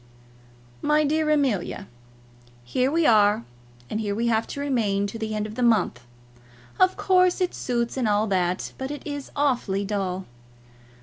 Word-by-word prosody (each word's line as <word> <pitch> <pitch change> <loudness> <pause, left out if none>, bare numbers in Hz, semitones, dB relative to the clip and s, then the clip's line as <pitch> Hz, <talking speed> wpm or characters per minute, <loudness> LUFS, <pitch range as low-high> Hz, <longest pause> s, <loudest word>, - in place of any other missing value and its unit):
MY 300 +1 +3
DEAR 310 +1 +1
AMELIA, 245 - 0 0.8
Here 250 - 0
we 330 +1 +2
are, 205 - +4 0.4
and 215 - -3
here 205 -2 -2
we 230 +2 -1
have 225 -1 +1
to - - -6
remain 225 -8 0
to 205 +3 -6
the 220 -1 -3
end 210 0 -1
of 215 - -7
the 250 - -4
month. 200 - +2 0.7
Of 370 0 +4
course 365 -1 +3
it 365 -1 0
suits, 235 0 -2
and 250 -4 +1
all 210 +1 +2
that; 185 -3 -1
but 265 0 -3
it 290 -1 -7
is 285 -2 -5
awfully 245 -9 0
dull. 190 -2 -2
225 Hz, 165 wpm, -25 LUFS, 205-285 Hz, 0.8 s, are